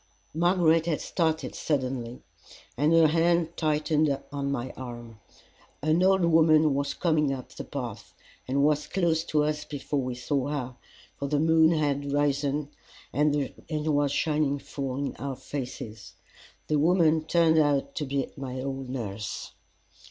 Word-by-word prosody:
Margaret 165 -1 +3
had 160 -3 0
started 160 -5 -1
suddenly, 130 -4 -2 0.5
and 150 +4 +2
her 165 -1 +6
hand 165 +1 +2
tightened 150 -2 +1
on 140 -1 -2
my 130 -2 -3
arm. 120 -3 -9 0.6
An 155 +3 +2
old 190 -1 +4
woman 160 -2 +5
was 140 +1 -1
coming 155 -5 +1
up 130 -2 -5
the - - -8
path, - - -7 0.3
and 140 +2 +1
was 150 0 +2
close 165 -4 +1
to 150 -2 +1
us 150 0 -1
before 145 -1 -3
we 125 -1 -3
saw 130 +2 -1
her, 130 -4 -4 0.4
for 140 - -2
the 145 +1 +1
moon 160 0 +5
had 145 -3 0
risen, 145 0 0 0.4
and 145 -1 +2 0.2
was 150 -2 +1
shining 150 -1 +1
full 135 -2 -5
in 140 0 -3
our 140 -1 -4
faces. 125 -6 -7 0.5
The 150 -1 +1
woman 160 -1 +3
turned 160 -1 +4
out 140 -2 +1
to 150 - -1
be 135 0 -1
my 130 -2 -5
old 135 -1 -4
nurse. 110 -5 -5
145 Hz, 145 wpm, -27 LUFS, 135-160 Hz, 0.6 s, her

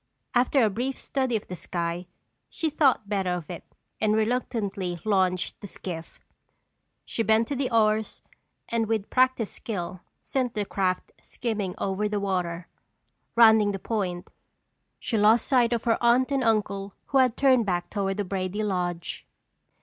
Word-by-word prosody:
After 250 +1 +3
a 220 - +4
brief 255 +6 -2
study 260 -4 -1
of 215 - -2
the 180 - -6
sky 170 +1 -3 0.4
she 320 -2 -2
thought 275 -8 +3
better 195 -3 0
of 175 -1 -6
it 175 - -7 0.4
and 215 -1 +2
reluctantly 215 -6 -1
launched 185 -3 +1
the 205 - -7
skiff. 170 -3 -8 0.9
She - - -2
bent 220 0 +3
to 285 - -1
the 265 -1 -1
oars 220 -1 +1 0.4
and 230 -1 0
with 220 -2 -1
practiced 255 -4 +2
skill 180 -4 -5 0.2
sent 255 -3 -1
the 210 -1 -1
craft 185 -2 -1
skimming 215 -6 -3
over 200 +2 -1
the 210 -1 -1
water. 180 -3 -2 0.7
Rounding 220 -3 +6
the - - -2
point, 185 -4 -3 0.7
she 225 - -1
lost 215 +2 +5
sight 245 -3 +3
of 235 -2 0
her 230 -1 +2
aunt 245 +3 +4
and 270 -2 +1
uncle 200 -3 0
who 270 - +3
had 255 -3 +3
turned 255 -5 +4
back 175 -2 -1
toward 195 -2 -1
the 205 - -1
Brady 190 +2 -2
lodge. 180 -4 -3
215 Hz, 155 wpm, -26 LUFS, 185-235 Hz, 0.9 s, Rounding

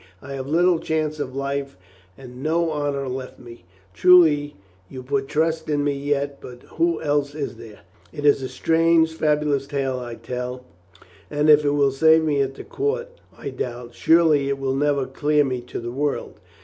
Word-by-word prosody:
I 140 +5 -9
have 135 -1 -5
little 170 +3 +3
chance 155 -1 -2
of 130 -3 -4
life 140 -1 -3 0.4
and 125 -1 -11
no 165 +2 0
honor 145 -2 -2
left 130 0 -6
me. 120 -6 -13 0.3
Truly, 155 - +5 0.3
you 130 -1 -8
put 135 +1 -1
trust 160 +1 -1
in 145 -1 +1
me 145 0 +1
yet, 140 0 -2
but 125 0 -11
who 165 0 -1
else 145 -1 0
is 145 -2 -5
there? 110 -2 -13 0.3
It 145 -2 -6
is 145 -1 +5
but 135 - -5
a - - -5
strange, 165 0 +2
fabulous 150 -3 0
tale 135 -3 -2
I 120 -1 -7
can 115 - -20
tell 125 +1 -5 0.6
and 150 +1 +3
if 150 0 +6
it 145 - +2
will 145 -1 +2
save 160 +4 +4
me 145 -3 +1
at 135 0 -2
the - - -9
court 465 +4 -2 0.3
I - - -6
doubt. 120 -1 -6
Surely 155 -1 +3
it 140 - -1
will 135 -1 -2
never 140 0 +1
clear 150 +1 +1
me 130 -2 -3
to - - -5
the 120 0 -5
world. 145 +3 -3
145 Hz, 190 wpm, -22 LUFS, 135-155 Hz, 0.6 s, if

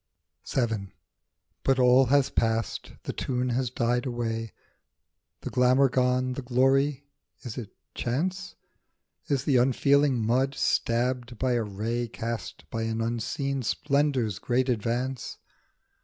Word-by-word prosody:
1C 125 -3 +1
VII. 100 -4 -5 0.7
BUT 135 -1 +2
all 125 +1 +6
has 140 +1 +3
passed, 115 -2 -1
the - - -4
tune 125 -1 -1
has 125 0 0
died 120 +2 0
away, 115 -2 -3 0.9
The - - -5
glamour 130 +2 +4
gone, 125 0 +1
the 135 - -5
glory; 135 +3 +2 0.4
is 120 -3 -6
it 120 -6 -8 0.2
chance? 180 +10 -2 0.7
Is 140 -2 0
the 135 -4 +3
unfeeling 135 +2 +3
mud 130 +4 +1
stabbed 120 0 0
by 130 +3 0
a 120 -1 +2
ray 110 +3 -2
Cast 115 -4 -6
by 115 - -2
an 110 0 -2
unseen 120 +5 -2
splendour's 135 -6 0
great 130 +1 0
advance 125 +3 -2
125 Hz, 125 wpm, -27 LUFS, 115-135 Hz, 0.9 s, all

